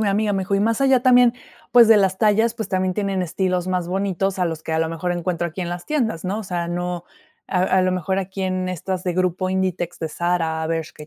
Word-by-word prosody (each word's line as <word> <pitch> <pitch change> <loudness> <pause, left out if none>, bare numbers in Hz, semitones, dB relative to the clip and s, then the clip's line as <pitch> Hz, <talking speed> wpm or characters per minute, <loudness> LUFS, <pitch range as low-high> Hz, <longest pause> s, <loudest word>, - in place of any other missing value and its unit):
mi 215 - +1
amiga. 205 +1 +1
Me 195 - 0
dijo: 195 +2 -1
"Y 195 - +2
más 225 +4 +1
allá 265 -2 +4
también, 245 -2 +6 0.4
pues, 240 -2 +7
de 225 - +8
las 190 -2 +2
tallas, 220 +2 +3
pues, 220 -3 -5
también 185 -1 0
tienen 195 -1 -1
estilos 180 +1 -1
más 180 -2 -1
bonitos 195 0 -1
a 180 - +2
los 160 -2 -3
que, 160 - -4
a 160 - +1
lo 160 - +1
mejor, 165 +2 -2
encuentro 175 0 -2
aquí 170 +4 -8
en 175 - -4
las 175 0 -6
tiendas", 225 - -1
¿no? 200 +4 -2
O - - -6
sea, 175 -2 -3
no, 175 0 -3 0.4
a 185 - 0
a 190 0 +3
lo 185 0 +1
mejor, 185 +2 -1
aquí 190 0 -4
en 185 -1 -1
estas 185 +1 -3
de 180 -2 -1
Grupo 185 0 0
Inditex, 185 -2 -2
de 160 - -3
Zara, 165 -1 -1
Bershka, 160 -1 -4
y - - -11
185 Hz, 255 wpm, -21 LUFS, 175-195 Hz, 0.4 s, de